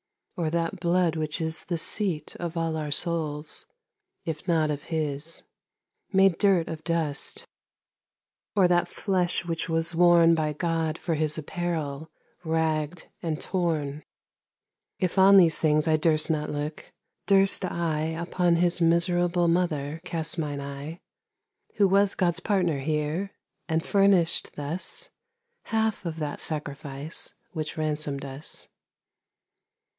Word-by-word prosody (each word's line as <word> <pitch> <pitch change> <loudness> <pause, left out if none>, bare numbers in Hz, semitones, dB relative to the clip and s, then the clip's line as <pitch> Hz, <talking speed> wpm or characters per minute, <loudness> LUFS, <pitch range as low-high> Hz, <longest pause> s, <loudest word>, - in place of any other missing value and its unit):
or 165 -3 -1
that 165 +1 -2
blood 175 -1 +2
which 155 -2 -2
isThe 160 +2 -1
seat 170 -5 -1
of 170 -1 -5
all 165 -1 -1
our 155 -1 -3
Soules, 155 -1 -1 0.6
if 160 +2 -5
not 160 -3 +2
of 145 -1 -5
his, 155 0 -1 0.7
Made 195 -3 +4
durt 190 -5 +3
of 160 -1 -6
dust, 160 -3 -1 1.1
or 190 -3 +5
that 175 0 +2
flesh 180 -3 -1
which 165 0 -3
was 165 +1 0
worneBy 165 -3 +4
God, 165 -1 -1
for 170 - -2
his 155 0 0
apparell, 160 -2 -3 0.4
rag'd, 160 0 -1 0.2
and 160 -2 -2
torne? 155 -6 -2 1.0
If 185 +1 0
on 195 +1 +8
these 170 -4 +5
things 155 0 +2
I 155 -1 +4
durst 155 0 +3
not 150 -1 -1
looke, 150 +1 -5 0.4
durst 195 -1 +5
IUpon 170 0 0
his 175 0 +2
miserable 175 +1 +2
mother 165 -3 0
cast 165 -2 0
mine 145 -3 -3
eye, 140 +4 -7 0.8
Who 200 -2 +4
was 200 +1 +3
Gods 175 -1 +1
partner 180 -8 0
here, 155 +6 -2 0.4
and 160 0 0
furnish'd 195 -4 +3
thusHalfe 225 - -3
of 165 -1 -4
that 150 -2 -4
Sacrifice, 145 -1 -2 0.2
which 155 -2 -5
ransom'd 150 -2 -1
us? 135 +3 -4
165 Hz, 120 wpm, -26 LUFS, 155-175 Hz, 1.1 s, on